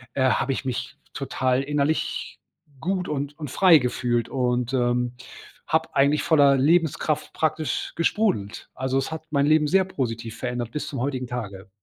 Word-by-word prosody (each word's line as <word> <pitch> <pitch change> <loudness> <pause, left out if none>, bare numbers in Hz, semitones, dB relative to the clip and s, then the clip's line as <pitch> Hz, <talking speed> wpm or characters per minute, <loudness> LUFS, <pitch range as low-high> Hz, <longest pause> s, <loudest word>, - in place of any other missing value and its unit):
äh, 130 - +1
habe 135 - 0
ich 135 - -5
mich 130 -2 -4 0.2
total 130 0 0
innerlich 145 +2 -1 0.4
gut 180 +4 -2
und 145 0 -3
und 150 -5 -6
frei 185 -4 +6
gefühlt 120 -2 0
und, 125 -1 -1
ähm, 125 -1 +1 0.5
habe 160 0 0
eigentlich 140 +2 +3
voller 145 -4 +5
Lebenskraft 155 +1 +1
praktisch 155 -1 -1
gesprudelt. 170 - 0
Also, 130 +1 -1
es 135 +4 -1
hat 160 0 -5
mein 140 -1 +2
Leben 155 0 +4
sehr 190 +5 +4
positiv 115 -10 -4
verändert 120 -2 -3
bis 150 - -4
zum 135 - -5
heutigen 130 -1 -2
Tage. 105 -5 -6
140 Hz, 155 wpm, -24 LUFS, 125-155 Hz, 0.5 s, frei